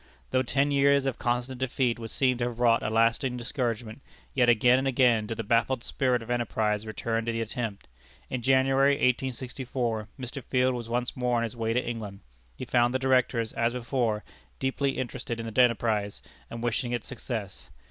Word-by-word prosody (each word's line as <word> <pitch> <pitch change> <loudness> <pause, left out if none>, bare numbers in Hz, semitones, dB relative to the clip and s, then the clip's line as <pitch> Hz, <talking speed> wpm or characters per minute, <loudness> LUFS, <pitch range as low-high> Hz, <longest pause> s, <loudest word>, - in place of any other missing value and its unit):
Though 130 - +3
ten 140 +3 +1
years 140 0 +4
of 135 - -2
constant 125 +1 -1
defeat 125 -2 0
would 115 -1 -6
seem 130 +1 +1
to 120 - +1
have 120 -1 -5
wrought 115 -1 +4
a - - -1
lasting 115 +3 +2
discouragement, 120 -1 -3 0.3
yet 125 -2 +3
again 120 +2 +5
and 135 - -1
again 120 -5 +3
did 115 0 -4
the 115 - -2
baffled 120 +3 +1
spirit 125 -3 0
of 115 - -7
enterprise 110 -3 0
return 115 +1 -2
to - - +1
the 115 - -2
attempt. 115 -2 -4 0.4
In 130 - -3
January, 135 +2 +4
1864, 125 -3 -1
Mr. 130 +1 -6
Field 130 0 +2
was 120 -2 -5
once 120 +1 -1
more 125 -1 +1
on 115 - +1
his 115 +1 -4
way 115 -1 -1
to 125 - 0
England. 105 -4 -5 0.4
He - - -5
found 120 +1 +2
the - - +5
Directors, 130 -3 +1
as 115 +1 0
before, 115 -3 -1 0.3
deeply 135 +1 -1
interested 120 -1 -4
in 115 - -4
the 115 +3 +2
enterprise, 110 -4 +1 0.3
and 115 0 -6
wishing 120 +1 -1
it 120 - -2
success. 110 -5 -6
120 Hz, 190 wpm, -28 LUFS, 115-130 Hz, 0.4 s, again